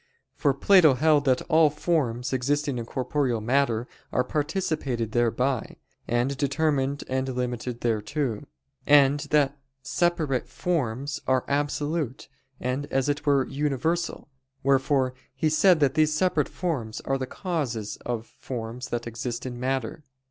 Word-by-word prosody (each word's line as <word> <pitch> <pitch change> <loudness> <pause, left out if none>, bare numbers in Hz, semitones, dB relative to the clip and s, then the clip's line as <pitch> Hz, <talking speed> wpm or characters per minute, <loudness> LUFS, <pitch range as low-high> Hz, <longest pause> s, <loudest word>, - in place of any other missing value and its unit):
For 140 -2 +1
Plato 160 -2 +6
held 150 +1 +3
that 130 -2 +2
all 160 -1 +4
forms 135 -5 -1
existing 140 +1 0
in 115 - -6
corporeal 130 -2 -1
matter 120 0 +1 0.2
are 125 - +2
participated 145 - -2
thereby, 120 +1 0 0.3
and 120 +4 +1
determined 140 -1 0
and 130 0 -1
limited 125 -1 -3
thereto; 120 +3 -1 0.4
and 145 -1 +6
that 145 -1 +2 0.2
separate 165 -7 0
forms 140 -5 -2
are 130 -1 +2
absolute 145 -1 -2 0.3
and 130 +3 -2
as 135 +1 0
it 145 +1 -2
were 140 -2 +4
universal; 150 +4 -1 0.4
wherefore 135 -1 +2 0.2
he 155 +4 +1
said 165 +2 +5
that 135 -2 +3
these 155 0 +3
separate 155 -3 +1
forms 135 -12 -3
are 135 0 -1
the 130 - -3
causes 130 - -3
of 120 -2 -4
forms 120 +1 -6
that 120 0 -3
exist 120 +1 -4
in 120 -1 -5
matter. 130 +2 -2
135 Hz, 135 wpm, -26 LUFS, 125-150 Hz, 0.4 s, Plato